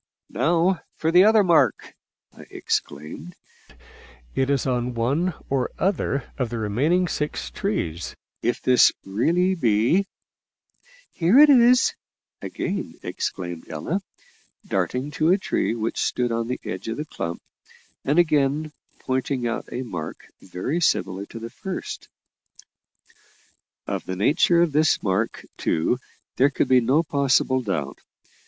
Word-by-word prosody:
"Now 175 +3 +2
for 160 - 0
the 180 +2 +7
other 215 -1 +5
mark," 170 -4 +2 0.4
I - - -12
exclaimed; 75 +4 -4 1.0
"it 135 0 0
is 140 -3 +1
on 125 -1 -1
one 145 +10 0
or 135 -2 0
other 165 -8 -1
of 125 -3 0
the 120 - -4
remaining 140 - +1
six 150 -2 -3
trees, 85 - -3 0.3
if 120 - -1
this 125 -1 +6
really 170 - +1
be 125 - +2 0.5
" - - -48 0.3
"Here 180 +8 +3
it 300 0 +9
is," 250 -1 +5 0.5
again - - -4
exclaimed 85 -2 -5
Ella, 80 - -3 0.6
darting 130 +4 -2
to 155 +2 +1
a 185 - +5
tree 150 - -1
which 115 0 -2
stood 125 -1 0
on 115 0 -1
the 125 - -3
edge 95 +3 -5
of 115 - -3
the 150 - -4
clump, 85 - -5 0.6
and 145 +4 +1
again 155 -2 +2 0.3
pointing 130 -1 -1
out 115 - -3
a 130 - -3
mark 85 -10 -7
very 95 - -3
similar 100 - 0
to - - -10
the 115 +1 -7
first. 190 +7 -6 1.8
Of - - -4
the 95 - -3
nature 155 - +3
of 170 - 0
this 155 +2 +2
mark, 100 +3 -1
too, 85 +10 0 0.4
there 135 +2 +5
could 140 - 0
be 130 -1 +5
no 135 +8 +2
possible 135 -3 +2
doubt. 80 - -3
130 Hz, 135 wpm, -23 LUFS, 115-165 Hz, 1.8 s, it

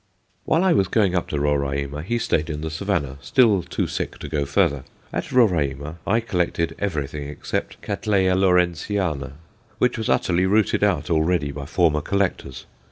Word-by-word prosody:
While 165 +3 +2
I 190 -2 +4
was 95 - +2
going 100 -2 +2
up 90 - 0
to 75 - -2
Roraima, 70 0 -1
he 120 +9 -1
stayed 80 -8 0
in 75 -1 -4
the 80 0 -4
Savannah, 80 -6 -2
still 110 - +3
too 85 0 -2
sick - - -4
to - - -7
go 75 -2 -1
further. 70 -2 +1 0.3
At - - -3
Roraima 80 - +1
I 115 +4 +2
collected 90 -6 -1
everything 75 -6 -3
except 75 - -4
Catt. 105 +2 -5
Lawrenceana, 95 -5 +1 0.4
which 125 -1 +1
was 110 - -2
utterly 90 +1 +2
rooted 105 +1 +2
out 85 -6 +1
already 80 -2 +1
by 70 0 -7
former 80 -2 +2
collectors. 95 -9 -2
85 Hz, 165 wpm, -23 LUFS, 75-100 Hz, 0.4 s, I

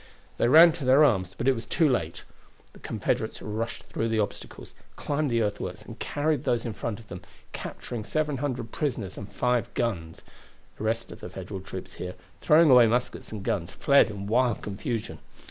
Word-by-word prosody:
They - - +3
ran 165 +6 +9
to 160 -2 -7
their 130 +4 +6
arms, 95 -9 +2
but 125 - -2
it 135 - +6
was 115 -2 -7
too 160 +5 +3
late. 85 - -1 0.5
The - - -15
Confederates - - -2
rushed 110 +2 -4
through 115 - -3
the 110 - 0
obstacles, 105 -2 -4 0.2
climbed 145 0 -1
the 115 -1 +2
earthworks, 105 -1 -4
and 115 +1 -11
carried 150 -1 -1
those 120 -4 0
in 115 - -3
front 110 -1 -4
of 110 - -15
them, 90 - -8 0.3
capturing 115 -3 -6
700 135 -3 -2
prisoners 115 - -3
and 100 - -8
five 125 -1 0
guns. 85 -9 -2 0.6
The 110 - -4
rest 115 +1 -1
of - - -10
the - - -8
Federal 95 -2 -7
troops 95 -1 -8
here, 90 0 -5 0.2
throwing 155 -1 +5
away 125 -2 +8
muskets 120 +2 -1
and 105 -3 -6
guns, 85 -4 -1
fled 140 -3 +4
in 100 -2 -6
wild 120 +2 +1
confusion. 105 +2 -4
115 Hz, 185 wpm, -27 LUFS, 105-130 Hz, 0.6 s, ran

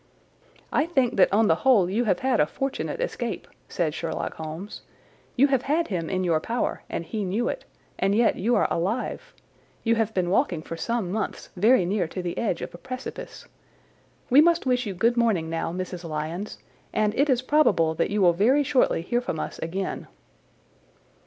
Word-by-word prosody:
"I 300 - +2
think 265 -10 +1
that 190 - +5
on 215 +2 +4
the 160 - +3
whole 235 -9 +5
you 220 +6 0
have 215 - +1
had 260 -3 +1
a 150 - +4
fortunate 270 - -3
escape," 240 - -3 0.2
said 160 -3 -1
Sherlock 165 0 -3
Holmes. 160 +6 -7 0.5
"You 270 - +5
have 270 -3 +2
had 310 +5 0
him 170 -5 -2
in 185 -1 -1
your 165 -3 +2
power 235 +9 -2
and 170 - -4
he 210 +5 -3
knew 205 +6 -1
it, - - -5 0.3
and 195 +1 +2
yet 230 +1 +3
you 235 +5 +1
are - - +3
alive. 225 - -3 0.5
You 230 - +3
have 225 -1 +1
been 180 -2 0
walking 180 - +1
for 165 - -6
some 225 0 -2
months 215 +2 -3
very 210 +1 +4
near 185 -1 0
to 185 +2 -6
the 175 -1 -3
edge 205 -7 -1
of - - -7
a 175 - -10
precipice. 255 +3 -7 0.9
We 275 +4 +8
must 340 0 +3
wish 250 -2 +1
you 195 - -4
good 230 +6 +2
morning 200 -9 +1
now, 165 0 -2
Mrs. 180 0 -5
Lyons, 165 +5 -4 0.3
and 210 -1 +1
it 285 +5 +2
is 255 -1 +2
probable 255 - +3
that - - 0
you 205 0 +1
will 175 -1 +6
very 245 +11 +3
shortly 265 - +2
hear 240 +7 0
from 160 -10 -4
us - - -5
again." 185 +4 -4
210 Hz, 190 wpm, -25 LUFS, 175-250 Hz, 0.9 s, We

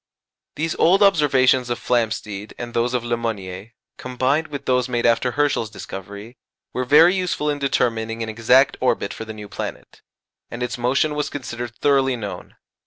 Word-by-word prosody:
These 160 +1 -1
old 190 +5 +4
observations 135 -8 +3
of 120 - -1
Flamsteed 110 -4 -2
and 120 -1 -7
those 120 +2 0
of 120 - -1
Le 120 0 0
Monnier, 105 -2 -5 0.3
combined 130 +5 0
with 145 -2 -7
those 125 0 +1
made 120 -1 -1
after 120 +1 +2
Herschel's 145 -6 0
discovery, 100 +3 -9 0.4
were 125 - -2
very 160 +7 +6
useful 180 -5 -1
in 145 - -4
determining 115 -4 -1
an - - -5
exact 125 +5 +3
orbit 125 -5 0
for 110 - -7
the 110 - -7
new 105 -1 -9
planet, - - -7 0.5
and 120 +1 -5
its 120 -3 -3
motion 130 +5 +1
was 150 0 -2
considered 120 -4 -6
thoroughly 135 -1 +2
known. 105 -4 -7
125 Hz, 170 wpm, -21 LUFS, 115-140 Hz, 0.5 s, very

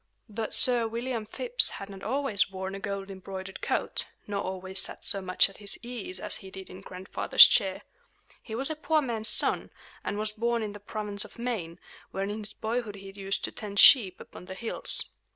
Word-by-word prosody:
But 220 +1 -4
Sir 240 -2 +5
William 230 -1 -4
Phips 485 - +3
had 195 - -8
not 195 -1 -11
always 255 -5 +2
worn 190 0 -6
a 195 - -6
gold 195 0 -5
embroidered 190 0 -8
coat, - - -2 0.2
nor 200 -1 -3
always 190 +1 -3
sat - - -2
so 200 -2 +5
much 185 -1 +3
at 195 - -15
his 205 -1 -3
ease 230 -7 -5
as - - -2
he 195 - -12
did 190 0 -10
in 185 +1 -11
Grandfather's 185 -1 +5
chair. 195 -4 +1 0.6
He 220 - -7
was 270 +6 0
a - - -3
poor 310 0 +1
man's 225 -4 0
son, - - +1 0.3
and 205 - -3
was 215 0 -2
born 230 +1 -1
in 210 -1 -5
the 205 - -10
province 205 0 -3
of - - -14
Maine, 220 -9 -4 0.3
where 195 - -3
in 205 +2 -4
his 210 -1 -3
boyhood 225 -1 -3
he 195 0 -10
used 195 0 -4
to - - -2
tend 205 -2 -5
sheep 210 -10 +7
upon - - -12
the 190 0 -8
hills. 225 +4 -2
205 Hz, 205 wpm, -28 LUFS, 195-230 Hz, 0.6 s, sheep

